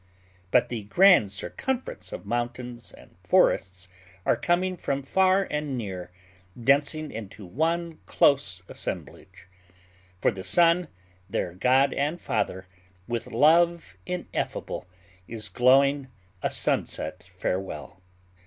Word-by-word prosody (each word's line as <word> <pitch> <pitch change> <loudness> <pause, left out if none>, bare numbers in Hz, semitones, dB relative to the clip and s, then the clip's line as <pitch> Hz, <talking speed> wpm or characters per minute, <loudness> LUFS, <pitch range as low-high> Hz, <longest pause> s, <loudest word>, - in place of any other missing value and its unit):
But 125 +5 +3
the 115 -4 -5
grand 175 - +5
circumference 255 - -4
of - - -7
mountains 120 +2 -4
and - - -17
forests 90 -1 +2 0.4
are - - +4
coming 175 +8 0
from 140 -5 -3
far 190 +6 +3
and 150 -3 -2
near, 95 -6 -5 0.5
densing 145 +4 +2
into 105 -2 -8
one 165 - -1
close 95 -10 +2
assemblage; - - -7 0.7
for - - +3
the 95 -3 -7
sun, 170 - +4 0.4
their 85 - -2
god 130 +8 +3
and 150 +5 -1
father, 95 - -2 0.4
with 120 -1 -3
love 165 - +3
ineffable, 180 - -4 0.4
is 110 -3 -6
glowing 135 +6 +4 0.3
a - - 0
sunset 90 +4 -1
farewell. 90 -2 -4
125 Hz, 110 wpm, -26 LUFS, 100-165 Hz, 0.7 s, grand